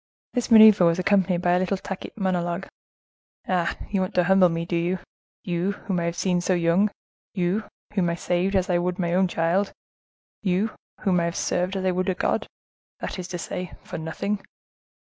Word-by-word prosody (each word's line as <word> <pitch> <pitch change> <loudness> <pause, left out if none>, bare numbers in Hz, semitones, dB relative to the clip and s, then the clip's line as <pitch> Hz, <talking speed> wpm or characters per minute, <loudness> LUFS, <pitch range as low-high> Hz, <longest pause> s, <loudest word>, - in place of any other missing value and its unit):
This 245 -1 -1
maneuver 220 -4 +8
was 170 0 +3
accompanied 185 -2 +2
by 175 - +3
a 180 - +4
little 185 +1 0
tacit 190 +2 -7
monologue. 180 -2 -1 0.8
"Ah! 180 -2 0
you 195 -2 +1
want 185 - -3
to 180 - +4
humble 190 0 +5
me, 165 0 -2
do 170 - -2
you?—you, 175 +1 -3
whom 195 -3 -3
I 170 - -1
have 170 0 -2
seen 180 0 +1
so 185 +1 +1
young—you, 180 +2 -1 0.3
whom 185 -4 +1
I - - 0
have 170 - -6
saved 180 +3 0
as 185 -1 +2
I 175 -1 +2
would 180 +1 -1
my 175 -2 -1
own 185 +1 +3
child,—you, 185 +3 -2 0.3
whom 185 -3 +2
I 170 - +1
have 170 - -2
served 180 +2 -1
as 190 -1 -2
I 185 - +3
would 185 +2 -1
a 185 - 0
God—that 185 - -5
is 180 - -5
to 180 -1 -4
say, 180 +1 -5
for - - -6
nothing. 195 +6 -3
180 Hz, 185 wpm, -25 LUFS, 175-195 Hz, 0.8 s, maneuver